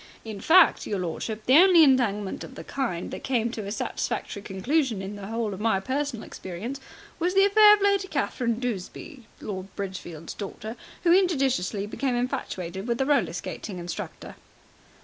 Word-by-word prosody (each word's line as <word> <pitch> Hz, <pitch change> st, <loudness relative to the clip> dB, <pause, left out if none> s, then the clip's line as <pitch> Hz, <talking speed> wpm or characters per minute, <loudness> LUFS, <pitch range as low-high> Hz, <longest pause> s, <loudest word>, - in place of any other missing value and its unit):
In 215 Hz, -3 st, -7 dB
fact, 345 Hz, -, +5 dB
your 205 Hz, -, -1 dB
lordship, 200 Hz, +5 st, -4 dB
the 260 Hz, +3 st, +6 dB
only 360 Hz, -3 st, +7 dB
entanglement 225 Hz, -8 st, +2 dB
of 265 Hz, -, -10 dB
the -, -, -8 dB
kind 235 Hz, -11 st, -3 dB
that -, -, -7 dB
came 235 Hz, -3 st, 0 dB
to 215 Hz, -4 st, -5 dB
a -, -, -4 dB
satisfactory 205 Hz, -1 st, -3 dB
conclusion 225 Hz, +5 st, 0 dB
in 195 Hz, +2 st, -6 dB
the 200 Hz, -1 st, -8 dB
whole 225 Hz, -1 st, -2 dB
of 190 Hz, -, -7 dB
my 215 Hz, -3 st, +2 dB
personal 260 Hz, +2 st, -3 dB
experience 210 Hz, +10 st, -6 dB, 0.4 s
was 355 Hz, +3 st, 0 dB
the 390 Hz, 0 st, +6 dB
affair 420 Hz, +1 st, +8 dB
of 415 Hz, -, -9 dB
Lady 400 Hz, -1 st, +2 dB
Catherine 245 Hz, -7 st, -1 dB
Duseby, 245 Hz, -, -5 dB, 0.2 s
Lord 190 Hz, -2 st, -5 dB
Bridgefield's 180 Hz, -5 st, -6 dB
daughter, 215 Hz, +2 st, -7 dB, 0.3 s
who 340 Hz, -, +4 dB
injudiciously 265 Hz, -, +1 dB
became 250 Hz, +4 st, -2 dB
infatuated 200 Hz, -7 st, -3 dB
with 235 Hz, -1 st, -1 dB
a 265 Hz, -, +2 dB
roller 245 Hz, -, +2 dB
skating 185 Hz, +2 st, -6 dB
instructor." 175 Hz, -1 st, -6 dB
230 Hz, 170 wpm, -26 LUFS, 195-280 Hz, 0.4 s, affair